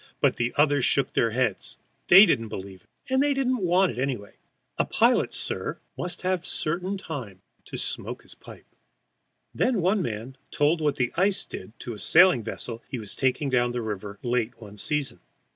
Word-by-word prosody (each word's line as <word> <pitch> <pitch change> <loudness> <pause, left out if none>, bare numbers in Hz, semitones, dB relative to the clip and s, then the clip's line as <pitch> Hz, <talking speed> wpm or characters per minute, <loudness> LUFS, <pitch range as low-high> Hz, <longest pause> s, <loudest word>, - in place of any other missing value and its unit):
But - - +2
the 120 0 0
others 145 -2 +3
shook 140 - +2
their 115 - +2
heads; 115 -3 -1 0.3
they 195 +4 +10
didn't 115 - +1
believe 95 -2 -8 0.2
it, 260 - -5
and 265 - +4
didn't 270 -3 +1
want 180 +1 +3
it - - -7
anyway. 125 -7 -3 0.5
A - - +3
pilot, - - +2
sir, - - -3 0.2
must 175 +1 -4
have 185 -1 0
a - - -15
certain 180 +5 -2
time 125 - -7 0.2
to - - -7
smoke - - -3
his - - -13
pipe! - - -14 0.9
Then 245 -4 +1
one 190 +3 +2
man 120 0 -5
told 155 +3 +1
what 150 -2 +1
the 125 -2 0
ice 195 +2 +2
did 115 - -9
to 120 - -5
a 105 - -9
sailing 175 - +5
vessel 115 +1 -5
he 130 - -4
was 105 -4 -6
taking 135 +1 0
down 120 -1 +2
the 120 - -2
river 105 -1 -5
late 120 -1 -1
one 105 -2 -11
season. 145 +6 -2
130 Hz, 185 wpm, -26 LUFS, 115-180 Hz, 0.9 s, they